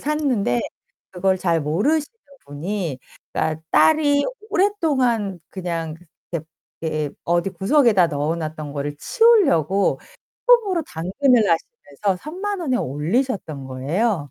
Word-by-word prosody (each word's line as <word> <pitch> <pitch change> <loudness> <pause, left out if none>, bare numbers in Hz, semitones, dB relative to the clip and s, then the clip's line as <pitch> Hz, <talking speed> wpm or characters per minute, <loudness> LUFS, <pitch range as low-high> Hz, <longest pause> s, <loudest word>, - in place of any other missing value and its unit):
샀는데 265 - 0 0.5
그걸 190 +1 +1
잘 170 -3 +1
모르시는 225 - +1 0.4
분이 160 0 -4 0.3
그니까 160 0 -1
딸이 285 - +4 0.3
오랫동안 265 - +1
그냥 170 -4 -4 0.9
이렇게 155 -3 -2
어디 175 +3 +1
구석에다 195 - +3
넣어놨던 155 0 -3
거를 145 0 -4
치우려고 280 - +3 0.5
처음으로 420 -9 +4
당근을 215 - +2
하시면서 185 +1 -2
30,000 380 +6 -4
원에 260 -6 0
올리셨던 160 - -2
거예요. 145 - -1
190 Hz, 260 characters per minute, -22 LUFS, -, 0.9 s, 딸이